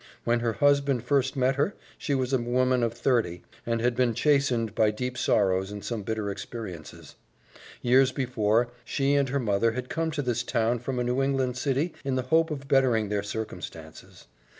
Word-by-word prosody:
When 120 0 +2
her 115 -1 -1
husband 140 -2 +2
first 135 -1 +1
met 130 0 +1
her, 150 +8 0 0.2
she 140 - -2
was 130 0 -1
a 130 - +3
woman 125 +1 +1
of 115 -1 +1
thirty, 115 -7 0 0.2
and 115 -1 0
had 120 0 +1
been 120 -2 +1
chastened 130 -7 +2
by 110 -1 +3
deep 125 +4 -4
sorrows 95 -4 +1
and 105 -1 -7
some 115 -3 -3
bitter 105 0 -3
experiences. 100 -5 -8 0.7
Years 130 +2 +4
before, 120 -3 +1
she 140 +3 0
and 140 -2 +2
her 140 +2 0
mother 115 -1 +1
had 125 +1 -5
come 165 0 -1
to 150 -2 -3
this 120 -2 0
town 115 0 0
from 125 +2 -4
a 125 - 0
New 125 +2 0
England 135 -2 0
city 140 +5 -1
in 135 -2 -1
the 130 - 0
hope 165 0 +4
of 140 -3 -6
bettering 125 -6 +3
their 105 -1 0
circumstances. 110 +1 -8
125 Hz, 190 wpm, -27 LUFS, 110-135 Hz, 0.7 s, Years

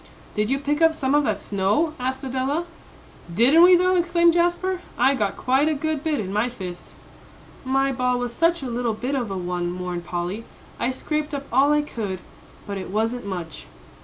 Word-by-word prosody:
"Did 210 +1 0
you 270 - +2
pick 290 +2 -1
up 325 -1 +5
some 270 -3 0
of 295 -1 +3
that - - 0
snow?" 205 +11 0
asked 260 +2 -2
Adela. 265 +5 -1 0.7
"Didn't 250 - +5
we, 360 +1 +8
though!" 365 +1 +3
exclaimed 345 -1 +3
Jasper. 350 +2 +1 0.2
"I 270 - +4
got 205 -7 -1
quite 265 +4 +2
a 310 - 0
good 310 0 -2
bit 310 -3 0
in 195 -2 -4
my 215 +4 +1
fist." 185 -7 -8 0.7
"My 270 +1 +1
ball 250 -1 0
was 245 -1 -3
such 335 +2 +1
a 260 - -3
little 235 -2 -1
bit 250 +5 -3
of 250 -6 -1
a 195 - -3
one," 175 -1 -2
mourned 180 -1 -4
Polly; 175 +5 -4 0.4
"I 240 - +1
scraped 300 +3 -3
up 280 0 -5
all 275 +3 +5
I 295 0 +3
could, 210 -9 -4 0.5
but 200 -1 -4
it 185 - -7
wasn't 225 +3 -1
much." 175 -5 -6
260 Hz, 195 wpm, -23 LUFS, 210-300 Hz, 0.7 s, we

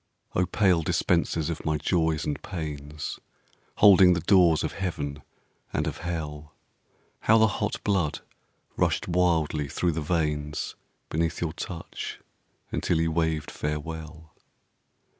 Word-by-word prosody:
Oh, 90 0 +2
pale 95 -3 +3
dispensers 85 0 +1
of 80 - -5
my 80 0 +1
Joys 80 0 +1
and 75 - -2
Pains, 75 -4 -5 0.6
Holding 95 -3 +7
the 85 - 0
doors 85 -2 +5
of - - -1
Heaven 75 -7 -4 0.5
and - - 0
of - - -4
Hell, 75 -3 -5 0.6
How 110 - +5
the 110 - +6
hot 105 -1 -1
blood 95 -7 0 0.6
rushed - - +1
wildly 85 -4 +1
through 85 +5 0
the 80 0 -3
veins 75 -2 -1 0.4
Beneath 80 +1 -1
your 80 -2 -2
touch, 85 -1 -6 0.5
until 85 - 0
you 80 0 +1
waved 80 -2 0
farewell. 80 +1 -5
80 Hz, 125 wpm, -27 LUFS, 75-90 Hz, 0.6 s, Holding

